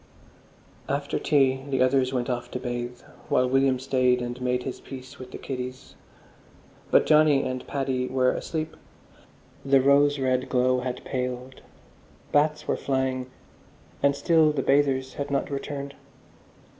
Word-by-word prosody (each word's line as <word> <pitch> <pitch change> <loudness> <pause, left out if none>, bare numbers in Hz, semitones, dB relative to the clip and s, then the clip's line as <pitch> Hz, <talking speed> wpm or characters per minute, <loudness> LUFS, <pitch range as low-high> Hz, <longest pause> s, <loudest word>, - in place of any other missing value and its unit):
After 140 +1 -1
tea 135 -3 +2
the 135 -2 +2
others 130 0 +2
went 125 -2 -1
off 120 -1 -3
to 125 - -4
bathe, 120 0 -5 0.3
while 125 0 +3
William 135 0 +3
stayed 125 -1 +2
and 120 +1 -5
made 125 0 0
his 130 - -5
peace 130 -1 -10
with 130 -1 -9
the - - -8
kiddies. 130 -1 -6 1.0
But - - +5
Johnny 150 -3 +5
and 130 0 -4
Paddy 130 -2 -1
were 130 -1 +2
asleep, 160 -1 -4 0.9
the 135 0 +4
rose 140 +2 +4
red 130 -1 0
glow 125 0 +2
had 125 0 -5
paled, 125 0 -4 0.7
bats 150 +1 +2
were - - 0
flying, 130 -1 -1 0.7
and 140 0 +3
still 160 0 +4
the 140 -3 -2
bathers 135 -2 +2
had 140 0 -4
not 140 0 -1
returned. 140 0 -5
130 Hz, 145 wpm, -26 LUFS, 125-140 Hz, 1.0 s, But